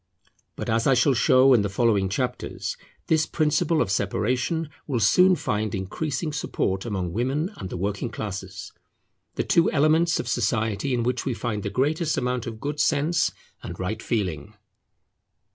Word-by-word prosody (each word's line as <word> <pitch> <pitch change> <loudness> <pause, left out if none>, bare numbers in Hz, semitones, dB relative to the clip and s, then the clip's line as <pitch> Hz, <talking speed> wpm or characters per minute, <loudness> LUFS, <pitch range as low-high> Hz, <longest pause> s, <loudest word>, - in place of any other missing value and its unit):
But - - -5
as 115 +1 +1
I 135 - +5
shall 135 +3 +4
show 130 +2 +5
in 120 - +5
the 100 - -1
following 100 -2 +2
chapters 125 +6 -3 0.3
this 160 -1 +2
principle 155 +1 +1
of 95 - -5
separation 125 - -1 0.2
will 130 -5 0
soon 180 - +5
find 105 - -2
increasing 145 - -3
support 95 -8 -2
among 95 -6 -3
women 135 - -1
and 95 - -6
the - - -5
working 100 +5 -2
classes; 105 -4 -6 0.6
the - - 0
two 170 - +3
elements 155 +3 +3
of - - -4
society 110 +1 0
in 120 - 0
which 125 +1 -1
we 130 -4 -1
find 110 -4 -3
the 100 - -3
greatest 150 - 0
amount 125 -1 -1
of 110 -2 -6
good 145 +4 -4
sense 155 +2 +2 0.3
and 85 - -8
right 95 +4 -3
feeling. 90 - -3
120 Hz, 160 wpm, -25 LUFS, 105-145 Hz, 0.6 s, I